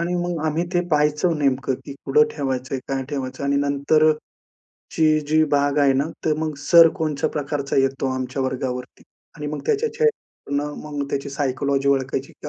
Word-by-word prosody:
आणि 175 +1 -1
मग 175 -3 -3
आम्ही 160 +2 0
ते 175 - +3
पाहायचं 150 +2 +2
नेमकं 135 -2 +1
की - - -7
कुठं 140 +2 +4
ठेवायचंय? 130 -2 -2
काय 135 -1 -1
ठेवायचं? 135 -2 -4
आणि 140 0 +1
नंतरची 145 +2 +1 0.9
जी 155 +1 +4
भाग 145 0 +2
आहे 140 -2 +5
ना, 135 +1 +1 0.2
तर 155 - +2
मग 155 -1 -2
सर 165 +3 +7
कोणत्या 155 -3 0
प्रकारचा 145 -1 -3
येतो 135 0 +1
आमच्या 130 +1 -3
वर्गावरती 130 -1 -4 0.3
आणि 150 -2 -5
मग 150 0 -4
त्याच्या 450 +1 +1
चेहऱ्यावरून 150 - -2 0.2
मग - - 0
त्याची 140 0 -3
सायकॉलॉजी 140 0 0
ओळखायची 135 0 0
की - - -9
145 Hz, 165 wpm, -22 LUFS, 135-155 Hz, 0.9 s, सर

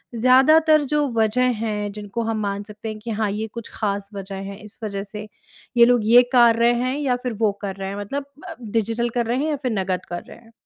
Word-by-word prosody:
ज़्यादातर 295 +6 +5
जो 295 -1 +2
वज़ह 245 +3 +2
हैं 210 -1 -2
जिनको 210 +2 -5
हम 225 -1 -2
मान 200 0 -2
सकते 215 +1 -8
हैं 215 0 -6
कि 230 +1 -6
हाँ, 215 -1 -1
ये 215 +2 -3
कुछ 235 -2 -7
ख़ास 200 -1 -2
वज़ह 195 0 -6 0.2
है 195 - -9
इस 210 - -10
वज़ह 200 -2 -3
से 210 +1 -8 0.5
ये 235 - +8
लोग 240 -3 +3
ये 245 +1 +8
कार 235 -2 +6
रहे 235 +1 +4
हैं 255 +2 -1
या 260 -4 +1
फ़िर 250 -2 -2
वो 215 -2 +4
कर 195 -2 -4
रहे 195 0 -5
हैं? 200 - -5
मतलब 275 +8 -4 0.2
अ, - - -7
डिजिटल 230 +2 -1
कर 240 - +1
रहे 240 +2 0
हैं 315 - -1
या 295 - 0
फ़िर 250 - 0
नकद 185 -1 -2
कर 175 0 -5
रहे - - -12
हैं? 230 -1 -20
220 Hz, 240 wpm, -22 LUFS, 205-245 Hz, 0.5 s, ये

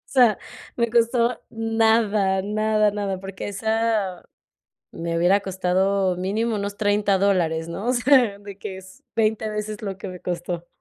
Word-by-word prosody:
O - - -5
sea, 235 -4 +6 0.4
me 235 -1 +1
costó 235 +1 +2
nada, 220 -4 +2
nada, 215 +1 +1
nada, 200 -2 -3
porque 195 0 -7
esa 220 -2 -1 0.7
me 165 0 -3
hubiera 180 +4 +4
costado 190 0 0
mínimo 215 +5 -1
unos 200 0 -4
$30 205 -1 +2
dólares, 170 -5 +1
¿no? 195 +7 -5
O 250 - +3
sea, 245 -5 +4
de 200 -1 -11
que 190 - -6
es 190 0 -15
20 220 0 +1
veces 210 0 -4
lo 195 -2 -4
que 195 - -6
me 180 -1 -8
costó. 175 -1 -4
205 Hz, 155 wpm, -23 LUFS, 190-220 Hz, 0.7 s, sea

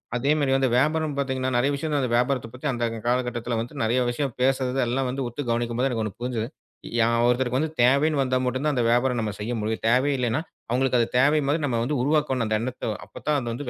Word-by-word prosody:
அதே 135 +4 +1
மாரி 140 -2 +1
வந்து 135 -1 +2
வியாபாரம் 155 +2 +1
பாத்தீங்கன்னா, 130 -1 -1
நறைய 135 +4 +2
விஷயங்கள் 145 0 -1
அந்த 125 -3 -1
வியாபாரத்தப் 125 -1 0
பத்தி 125 +4 -10
அந்த 120 -2 -3
அந்தக் 115 0 -6
கால 125 +1 +3
கட்டத்துல 120 -1 -3
வந்து 125 +5 -7
நறைய 120 +3 +2
விஷயம் 130 0 -2
பேசறது 130 0 +1
எல்லாம் 130 +2 0
வந்து 130 +1 -3
உத்துக் 120 +1 -5
கவனிக்கும்போது 120 +2 0
எனக்கு 115 -3 -1
ஒண்ணு 105 -1 -6
புரிஞ்சிது. 120 -2 -2 0.5
யா 115 - +4 0.2
ஒருத்தருக்குத் 130 +5 +1
தேவைன்னு 140 +4 +3
வந்தா 130 -1 +1
மட்டும் 130 +2 -1
தான் 150 - +2
அந்த 125 - +1
வியாபாரம் 120 +1 +2
நம்ம 110 -2 -2
செய்ய 105 +3 -3
முடியும். 110 +1 -3
தேவை 130 +4 +3
இல்லன்னா 125 +3 0 0.3
அவங்களுக்கு 125 +1 +2
அது 115 - +2
தேவை 145 +4 +4
மாரி 145 +4 +1
நம்ம 120 -4 0 0.2
உருவாக்கணும் 140 -3 +1
அந்த 110 0 +1
எண்ணத்த. 125 +1 -5 0.2
அப்பத்தான் 150 -1 -2
அது 120 -1 -4
வந்து 125 +2 -5
125 Hz, 215 wpm, -25 LUFS, 120-140 Hz, 0.5 s, யா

